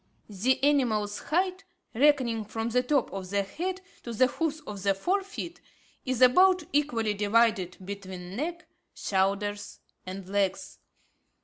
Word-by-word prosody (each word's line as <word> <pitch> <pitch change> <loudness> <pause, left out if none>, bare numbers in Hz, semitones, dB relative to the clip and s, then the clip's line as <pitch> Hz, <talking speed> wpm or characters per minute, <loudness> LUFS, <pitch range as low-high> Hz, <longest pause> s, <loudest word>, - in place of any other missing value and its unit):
The 225 +7 0
animal's 230 -8 +2
height, 370 +4 0 0.3
reckoning 255 -4 +3
from 225 +2 -3
the 250 +2 +2
top 265 0 0
of 190 -2 -5
the 200 0 +1
head 360 - -4 0.2
to 235 - -7
the 255 +4 +4
hoofs 315 +4 -2
of 210 -9 -8
the 195 0 +2
fore 370 - +1
feet, 380 -3 -7 0.5
is 255 -1 +2
about 365 +8 +6
equally 240 -8 +1
divided 205 -2 +2
between 190 -2 -7
neck, 340 +7 -4 0.3
shoulders, 200 +1 -1 0.3
and 185 0 -7
legs. 195 -1 -1
230 Hz, 135 wpm, -28 LUFS, 200-295 Hz, 0.5 s, about